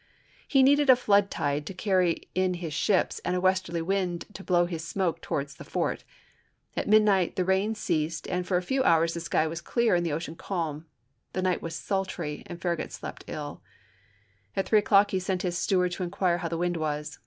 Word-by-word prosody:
He 270 -2 +4
needed 285 +1 +4
a 260 - +10
flood 205 -5 +3
tide 145 +1 -2
to 195 - -6
carry 185 -4 +1
in 185 0 +1
his 170 -3 -5
ships 190 +5 +1
and 180 - 0
a - - +1
westerly 185 -2 +1
wind 180 -2 -1
to 195 - -9
blow 175 -2 +3
his 165 -2 -5
smoke 170 0 -1
towards 140 0 -3
the - - -11
fort. - - -2 0.7
At - - -2
midnight 205 -4 +4
the 185 - 0
rain 190 +4 +1
ceased 160 -5 -2
and 180 0 -2
for 180 - +2
a 180 - -2
few 265 +8 0
hours 165 -4 +3
the 170 - -4
sky 165 -1 +1
was 165 +1 -4
clear 235 +5 +1
and 175 -1 +2
the 170 - -1
ocean 160 +1 -4
calm. 165 -3 -4 0.5
The 185 - -1
night 185 -1 +1
was 165 -1 -5
sultry 190 -7 -3
and 175 -1 -8
Farragut 175 -2 -2
slept - - -8
ill; 145 -2 -6 0.9
at 195 - -1
three 215 - +5
o'clock 205 -1 +4
he 190 - +1
sent 185 0 -2
his 175 -2 -1
steward 180 0 +1
to 180 - -3
inquire 180 -1 0
how 170 - -3
the 165 0 -3
wind 175 0 0
was. 150 -1 -3
180 Hz, 210 wpm, -27 LUFS, 165-195 Hz, 0.9 s, a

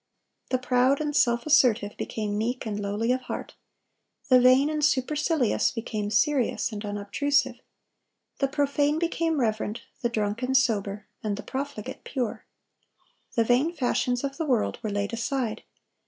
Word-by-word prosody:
The 255 - +2
proud 255 +2 +2
and 300 -1 -2
self 240 -5 +3
assertive 240 -9 +3
became 210 -2 -3
meek 235 +4 -2
and 210 -2 -3
lowly 205 +4 -1
of 255 0 0
heart. 250 - -6 0.8
The 255 -1 +7
vain 255 +3 +6
and 305 -1 -2
supercilious 295 -1 +2
became 215 -3 -4
serious 255 +2 +1
and 210 -1 -6
unobtrusive. 245 +6 0 0.8
The 275 - +2
profane 290 +1 +1
became 330 -2 0
reverent, 215 -2 -1 0.2
the 240 - +1
drunken 230 +4 -1
sober, 210 -5 +1 0.2
and 205 -2 -2
the 210 - -7
profligate 270 -5 -5
pure. 250 -5 -3 0.9
The 230 - +4
vain 255 +8 +2
fashions 250 -3 0
of 275 0 -3
the 325 - -2
world 245 -5 +1
were 220 - -3
laid 205 +1 -2
aside. 235 -2 -2
250 Hz, 145 wpm, -26 LUFS, 215-280 Hz, 0.9 s, The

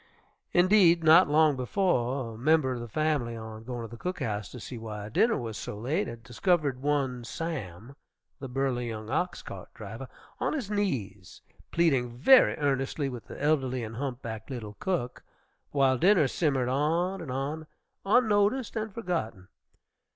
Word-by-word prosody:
Indeed, 175 -2 +5
not 160 +1 +7
long 155 -1 +4
before, 130 - 0
a - - -10
member 150 0 +3
of 125 - -5
the 120 - -6
family, 145 -2 0
on 110 0 -8
going 120 0 -5
to - - -6
the 115 +1 -11
cook 180 +1 -3
house 105 -2 -3
to 125 - -9
see 120 +1 -7
why 105 -2 -6
dinner 225 - +3
was 115 -5 -5
so 105 - -6
late, 125 +9 -1
had 115 -1 -8
discovered 140 - 0
one 135 -4 0
Sam, 120 - -6 0.4
the 135 - -7
burly 125 -2 -1
young 110 0 -6
ox 175 +5 -1
cart - - -9
driver, - - -8 0.3
on - - 0
his 260 -9 -3
knees, 110 - -3 0.3
pleading 130 -8 +1
very 255 - +6
earnestly 140 0 0
with 125 -3 -8
the - - -9
elderly 135 -4 +1
and 110 0 -6
humpbacked 125 -4 -5
little 110 -5 -6
cook, 170 -10 -2 0.5
while 135 -3 +2
dinner 180 -4 +5
simmered 135 -4 0
on 165 +8 0
and 160 - -7
on, 145 +4 -3 0.4
unnoticed 215 +3 +2
and 220 -1 -3
forgotten. 165 - -3
135 Hz, 160 wpm, -28 LUFS, 120-165 Hz, 0.5 s, not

